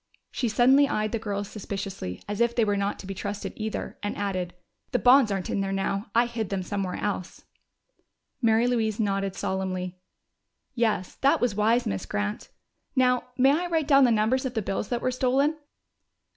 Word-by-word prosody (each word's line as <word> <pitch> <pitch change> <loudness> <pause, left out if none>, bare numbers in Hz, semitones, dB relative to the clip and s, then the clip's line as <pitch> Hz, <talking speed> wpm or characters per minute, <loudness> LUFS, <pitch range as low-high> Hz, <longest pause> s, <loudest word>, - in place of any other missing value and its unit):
She 245 - -1
suddenly 260 +6 +5
eyed 215 0 -1
the 230 - -1
girls 205 -2 -3
suspiciously, 195 - -6
as 205 +2 -3
if 235 0 +2
they 230 - +3
were 205 -1 +1
not 200 0 -1
to - - -10
be 195 - -4
trusted 200 +2 -5
either, 220 0 -5
and 205 - -3
added, 185 -3 -2 0.4
"The - - +4
bonds 250 -2 +6
aren't 195 -2 -2
in 200 - 0
there 195 0 -2
now! 195 +2 -1
I 235 +1 +5
hid 230 -4 -4
them 195 -2 -2
somewhere 195 -1 -3
else." 195 -3 -4 1.0
Mary 225 0 +4
Louise 225 -3 0
nodded 195 -2 0
solemnly. 185 -1 -3 0.7
"Yes, 220 -6 0
that 275 - +3
was 245 -4 +1
wise, 225 +4 +2
Miss 200 -4 -3
Grant.... 205 +1 -3 0.5
Now, 250 -1 +3
may 265 +1 +5
I 340 +5 +1
write 325 -4 0
down 275 -2 +6
the - - +4
numbers 230 +3 +2
of 255 -2 -4
the 220 - 0
bills 195 +1 -2
that 240 -1 -1
were 255 - 0
stolen?" 265 +4 +2
215 Hz, 185 wpm, -26 LUFS, 195-245 Hz, 1.0 s, bonds